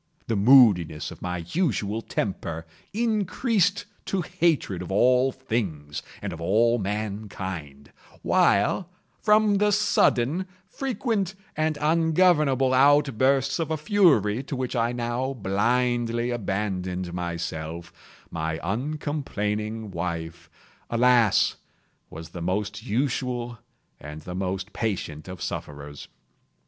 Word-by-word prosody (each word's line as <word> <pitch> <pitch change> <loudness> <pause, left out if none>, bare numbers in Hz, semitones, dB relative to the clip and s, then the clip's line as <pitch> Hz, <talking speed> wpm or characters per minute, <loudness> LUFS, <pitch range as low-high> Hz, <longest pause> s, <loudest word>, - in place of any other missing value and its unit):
The 115 - -1
moodiness 100 - +5
of - - -12
my 90 -2 -4
usual 115 - 0
temper 85 -7 -3 0.3
increased 210 -2 +1 0.2
to 195 - -1
hatred 155 - 0
of 90 - -6
all 125 +6 +4
things 100 - -3 0.2
and - - -3
of 80 - -8
all 115 +7 +3
mankind; 95 -8 -5 0.3
while, 105 - +2 0.3
from 210 -1 +4
the 210 0 +3
sudden, 185 - +2 0.2
frequent, 220 -5 -2 0.2
and 155 -1 0
ungovernable 155 -4 +3
outbursts 135 0 +3
of 165 - -1
a 160 - 0
fury 145 - +3
to 140 +1 -5
which 130 0 -3
I 115 0 +1
now 120 +2 -2
blindly 120 +2 0
abandoned 95 -5 -3
myself, 85 -1 -5 0.4
my 80 0 -2
uncomplaining 110 - -3
wife, 85 -1 -5 0.4
alas, 120 -2 +3 0.5
was 80 +1 -9
the 85 +1 -8
most 105 +5 -2
usual 120 -1 -2 0.4
and 75 +2 -9
the 90 - -7
most 95 +2 -3
patient 90 -8 -3
of 90 -2 -7
sufferers. 70 0 -6
115 Hz, 110 wpm, -25 LUFS, 90-145 Hz, 0.5 s, moodiness